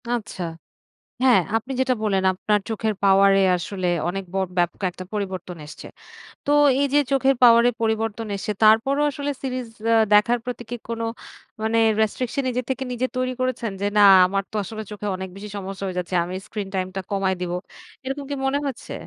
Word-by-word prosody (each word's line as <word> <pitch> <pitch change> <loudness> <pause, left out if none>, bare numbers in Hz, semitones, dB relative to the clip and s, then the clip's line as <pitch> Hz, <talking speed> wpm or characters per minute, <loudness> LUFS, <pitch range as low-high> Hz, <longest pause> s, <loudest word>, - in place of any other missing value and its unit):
আচ্ছা। 215 -6 -3 0.8
হ্যাঁ, 250 -6 +6 0.2
আপনি 230 +4 -6
যেটা 260 -1 +2
বললেন 195 -3 +1
আপনার 210 +3 +1
চোখের 220 0 -1
পাওয়ার 195 0 +6
এ - - +4 0.2
আসলে 185 +2 -4 0.2
অনেক 195 +2 -3
ব - - -6 0.2
ব্যাপক 175 +2 0
একটা 185 +1 -9
পরিবর্তন 185 -4 -4
এসছে। 150 - -10 0.6
তো 285 - +1 0.3
এই - - +3
যে 290 - +6
চোখের 270 0 +3
পাওয়ার 235 -1 +8
এ - - -1
পরিবর্তন 225 0 -1
এসে, 205 - -3
তারপরও 230 +7 +4
আসলে 285 +1 -3
সিরিজ 255 -2 -3 0.2
আ - - +5 0.2
দেখার 235 +4 +4
প্রতি 245 -1 -5
কি 240 - -3
কোনো 230 0 -3 0.6
মানে, 220 +1 +1 0.2
রেস্ট্রিকশন 245 +5 -1
নিজের 250 -1 -2
থেকে 265 0 -1
নিজে 250 +1 -1
তৈরি 255 0 -1
করেছেন? 255 -3 -1
যে, - - 0
"না, - - +6 0.2
আমার 195 +2 -1
তো - - -10
আসলে 220 +3 -6
চোখে 210 0 -5
অনেক 190 0 -6
বেশি 205 +1 -8
সমস্যা 195 0 -6
হয়ে 185 -1 -5
যাচ্ছে। 180 +1 -4
আমি 180 +1 -6
স্ক্রিন 210 -3 -5
টাইম 185 -1 -1
টা 195 - -2
কমায় 195 -1 +1
দিবো।" 175 0 -2 0.5
এরকম 270 +2 -4
কি - - -1
মনে 270 +1 +1
হচ্ছে? 265 - -6
220 Hz, 190 wpm, -23 LUFS, 195-250 Hz, 0.8 s, পাওয়ার